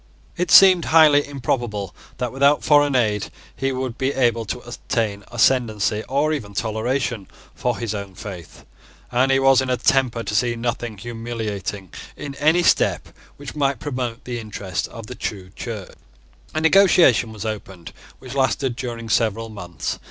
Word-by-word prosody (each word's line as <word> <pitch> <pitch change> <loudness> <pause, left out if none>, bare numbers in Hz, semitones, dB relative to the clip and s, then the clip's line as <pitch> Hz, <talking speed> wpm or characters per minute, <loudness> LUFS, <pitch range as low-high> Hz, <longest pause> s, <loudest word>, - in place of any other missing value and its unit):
It 180 +1 -2
seemed 185 -3 +8
highly 150 -3 +5
improbable 120 -8 -3 0.2
that, 125 -2 -2
without 140 +2 +3
foreign 145 -2 +4
aid, 105 -5 +1 0.3
he 135 0 -1
would 130 -2 -4
be 135 +1 0
able 120 -3 +1
to 110 - -4
obtain 115 -4 -3
ascendency, 110 -3 +1
or 145 +3 +1
even 105 -9 -5
toleration, 115 0 -2 0.3
for 125 -2 -2
his 115 -3 -3
own 100 -2 -6
faith: 90 -5 -10 0.5
and 130 +2 +2
he 135 - +4
was 135 -1 +5
in 130 - -3
a 125 - +1
temper 125 -1 +1
to 100 - -4
see 120 +2 +1
nothing 120 -1 -3
humiliating 110 -4 -5 0.3
in 145 -1 -6
any 160 +4 +3
step - - +2 0.3
which 145 0 -9
might 140 -2 +1
promote 125 -4 -4
the 120 -1 -4
interests 100 -5 -4
of 115 -1 -10
the 125 - -8
true 95 -6 -6
Church. 105 -3 -7 0.6
A 155 - 0
negotiation 160 - +5
was 110 0 -7
opened 95 -5 -6 0.2
which 130 -1 -10
lasted 130 -1 0
during 115 -2 -5
several 115 0 0
months. 90 -7 -5
120 Hz, 160 wpm, -21 LUFS, 110-135 Hz, 0.6 s, seemed